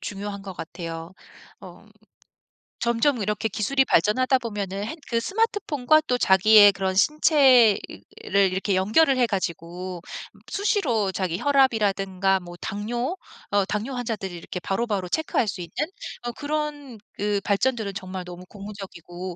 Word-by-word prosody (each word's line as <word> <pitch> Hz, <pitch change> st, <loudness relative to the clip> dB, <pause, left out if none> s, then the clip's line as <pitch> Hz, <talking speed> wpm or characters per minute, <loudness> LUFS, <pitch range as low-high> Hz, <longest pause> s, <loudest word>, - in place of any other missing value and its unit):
중요한 200 Hz, 0 st, -6 dB
것 195 Hz, -, -7 dB
같아요. 165 Hz, +1 st, -7 dB, 0.5 s
엄 -, -, -14 dB, 0.9 s
점점 235 Hz, +2 st, +1 dB
이렇게 210 Hz, +2 st, -1 dB
기술이 225 Hz, +6 st, +1 dB
발전하다 255 Hz, +9 st, +3 dB
보면은 205 Hz, -4 st, -4 dB
핸 240 Hz, -, -5 dB
그 230 Hz, -, +1 dB
스마트폰과 310 Hz, -, +1 dB
또 250 Hz, -, +1 dB
자기의 205 Hz, +1 st, +7 dB
그런 190 Hz, -1 st, -2 dB
신체를 265 Hz, -, +5 dB, 0.7 s
이렇게 190 Hz, +1 st, -1 dB
연결을 255 Hz, +9 st, +3 dB
해 245 Hz, -, +3 dB
가지고 180 Hz, -2 st, -4 dB, 0.5 s
수시로 255 Hz, -, 0 dB
자기 185 Hz, -2 st, -2 dB
혈압이라든가 200 Hz, -8 st, +2 dB
뭐 175 Hz, -1 st, -11 dB
당뇨 240 Hz, -, -3 dB, 0.4 s
어 200 Hz, -1 st, +2 dB
당뇨 210 Hz, +7 st, -3 dB
환자들이 225 Hz, -6 st, -4 dB
이렇게 175 Hz, +1 st, -7 dB
바로바로 195 Hz, -1 st, -2 dB
체크할 315 Hz, -, 0 dB
수 195 Hz, -2 st, -4 dB
있는 170 Hz, -1 st, -9 dB, 0.5 s
어 240 Hz, -, -3 dB
그런 290 Hz, -3 st, -4 dB, 0.2 s
그 205 Hz, 0 st, -1 dB
발전들은 210 Hz, 0 st, 0 dB
정말 185 Hz, -1 st, -6 dB
너무 180 Hz, +1 st, -10 dB
고무적이고 185 Hz, -3 st, -8 dB
205 Hz, 310 characters per minute, -24 LUFS, 190-250 Hz, 0.9 s, 자기의